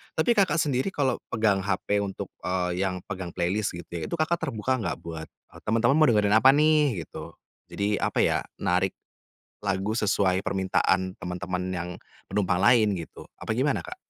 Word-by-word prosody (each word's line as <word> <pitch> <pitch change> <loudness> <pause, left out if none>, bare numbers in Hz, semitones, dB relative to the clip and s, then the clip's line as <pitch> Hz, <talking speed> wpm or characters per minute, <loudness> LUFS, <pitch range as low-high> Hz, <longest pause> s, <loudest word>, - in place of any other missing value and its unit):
tapi 240 - +2
Kakak 195 -6 +3
sendiri 145 -2 +1
kalau 135 -4 +1
pegang 110 -3 +1
hp 100 +1 0
untuk, 100 -1 -4 0.2
eee, 90 -1 -1
yang 95 -1 -1
pegang 95 -3 -5
playlist 95 +4 0
gitu 85 - -9
ya, 85 -2 -4
itu - - -3
Kakak 165 +2 +1
terbuka 130 -5 -1
enggak 110 - -3
buat, 80 -1 -7 0.4
"Teman-teman 115 +5 +2
mau 155 0 +5
dengerin 105 -1 +3
apa 130 +4 +7
nih?" 150 - +3
Gitu. 80 +1 -9 0.4
Jadi 100 +1 0
apa - - 0
ya, - - +2 0.2
narik 90 +2 +1 0.7
lagu 100 0 -1
sesuai 100 -4 +1
permintaan 95 -1 +1
teman-teman 90 +1 -4
yang 85 0 -3 0.4
penumpang 95 -2 +1
lain 110 -3 +5
gitu, 85 -3 -8 0.2
apa - - -5
gimana 140 +2 +1
Kak? 365 - -8
100 Hz, 165 wpm, -26 LUFS, 90-125 Hz, 0.7 s, apa